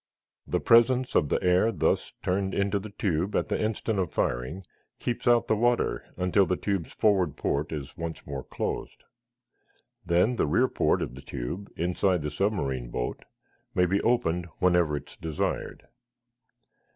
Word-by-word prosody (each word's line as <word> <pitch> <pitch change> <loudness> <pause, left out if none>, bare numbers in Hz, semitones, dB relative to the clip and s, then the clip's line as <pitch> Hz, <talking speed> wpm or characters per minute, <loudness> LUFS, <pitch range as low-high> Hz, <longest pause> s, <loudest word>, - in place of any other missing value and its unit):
The - - 0
presence 125 +2 +4
of 75 - +3
the - - +2
air 90 +5 +4
thus 105 - 0
turned 95 +1 0
into 100 0 +1
the 105 +2 -8
tube 95 -2 -1
at - - 0
the - - 0
instant 110 -1 -1
of 90 -4 -1
firing 65 +11 -2 0.3
keeps 120 0 -3
out 120 -1 +5
the 110 - +2
water 120 +2 +1
until 90 +1 +3
the 90 - +1
tube's 95 -3 -2
forward 95 - +2
port 70 +2 -1
is 75 -2 -6
once 85 -1 -6
more 70 -2 -5
closed. - - -4 1.0
Then 90 +8 +2
the - - +2
rear 120 - +3
port - - +1
of - - -5
the 65 - -10
tube, 70 +9 -6
inside 90 0 +1
the 75 - -2
submarine 70 - -1
boat, - - -4 0.5
may 90 - +4
be 95 +3 +1
opened 90 -8 +1
whenever 90 -4 +3
it - - -10
is - - -15
desired. 80 -3 -3
90 Hz, 165 wpm, -27 LUFS, 80-105 Hz, 1.0 s, out